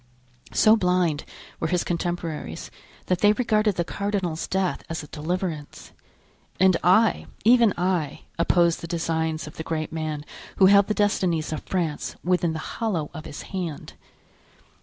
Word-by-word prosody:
So 215 +1 +5
blind 180 -6 +1 0.3
were 160 - 0
his 175 +1 +1
contemporaries 170 - -4 0.3
that 180 -1 0
they 205 +1 +5
regarded 215 -3 +1
the 175 - 0
cardinal's 190 -4 -2
death 190 -1 0
as 165 -1 -4
a - - -10
deliverance; 160 -1 -4 0.7
and 190 -1 +5
I, 210 +5 +4 0.2
even 235 -2 +6
I, 175 -5 -1 0.2
opposed 170 0 +3
the 170 - -6
designs 160 -1 -1
of 150 - -11
the 160 - -4
great 160 -1 -3
man 155 -2 -3 0.3
who 190 - +5
held 200 +1 +6
the 215 - 0
destinies 175 -6 +1
of 155 - -4
France 170 -5 -2
within 175 -2 +1
the - - -3 0.2
hollow 180 -10 -1
of 160 -2 -8
his 145 - -7
hand. 175 -6 -4
175 Hz, 150 wpm, -25 LUFS, 160-190 Hz, 0.7 s, even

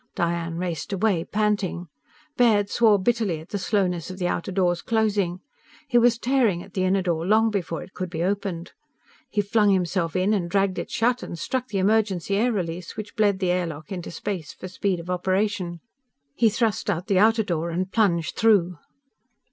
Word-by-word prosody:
Diane 170 -1 -1
raced 175 +2 -4
away, 195 -3 +1
panting. 205 -4 -1 0.5
Baird 210 -6 +3
swore 220 -3 +4
bitterly 205 -5 0
at 160 - -13
the 205 - -3
slowness 185 -4 0
of 185 - -7
the 180 -2 -1
outer 175 +2 -2
door's 180 -2 +1
closing. 205 -5 0 0.5
He 240 -3 +4
was 240 -1 +4
tearing 235 -8 +1
at 195 - -16
the 185 -1 0
inner 190 0 +2
door 170 -3 -1
long 220 +4 +3
before 175 -5 -3
it 190 - -15
could 185 -1 -4
be 165 -1 -3
opened. 190 -3 -2 0.6
He 210 - +1
flung 210 0 +2
himself 180 -3 0
in 185 +3 +2
and 180 -5 -1
dragged 195 0 +1
it - - -5
shut, 245 +2 +1
and 170 - -6
struck 255 +8 -2
the 205 - -3
emergency 200 -2 +1
air 235 +5 +2
release 175 -4 -4
which 210 -1 -7
bled 205 -3 +2
the 185 -2 0
air 180 -1 0
lock 155 +3 -9
into 180 -3 -5
space 175 -2 -5
for 185 - -8
speed 185 0 -1
of 170 +2 -6
operation. 185 -1 -1 0.5
He 225 +6 +3
thrust 220 -1 0
out 175 +2 -1
the 195 -2 +2
outer 220 +2 +4
door 170 -3 -2
and 185 +3 -2
plunged 175 -8 +1
through. 185 -7 +3
190 Hz, 190 wpm, -24 LUFS, 175-215 Hz, 0.6 s, swore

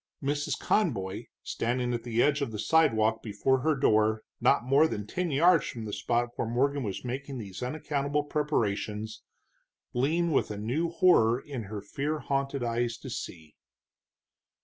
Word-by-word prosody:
Mrs. 145 +1 -1
Conboy, 110 - 0 0.2
standing 120 +1 -1
at 120 - -2
the 120 0 +1
edge 145 0 +2
of 140 - -2
the 110 - -5
sidewalk 110 -5 +3
before 120 +5 +1
her 155 +4 +1
door, 110 -4 +2 0.2
not - - +3
more 140 +5 +5
than 105 -9 -4
ten 180 +10 -2
yards 165 +3 +4
from 115 -3 -6
the 105 - -6
spot 120 +1 0
where - - -1
Morgan 140 +5 +1
was 105 0 -4
making 135 +2 -4
these 100 -3 -7
unaccountable 145 +2 -1
preparations, 110 -8 -2 0.7
leaned 160 +7 +1
with - - +2
a 105 - -5
new 130 +11 -1
horror 145 -9 +4
in 135 -6 -6
her 100 0 -6
fear 145 +9 -2
haunted 140 -2 -2
eyes 120 0 -1
to 130 +1 -9
see. 80 -8 -7
125 Hz, 160 wpm, -29 LUFS, 110-145 Hz, 0.7 s, more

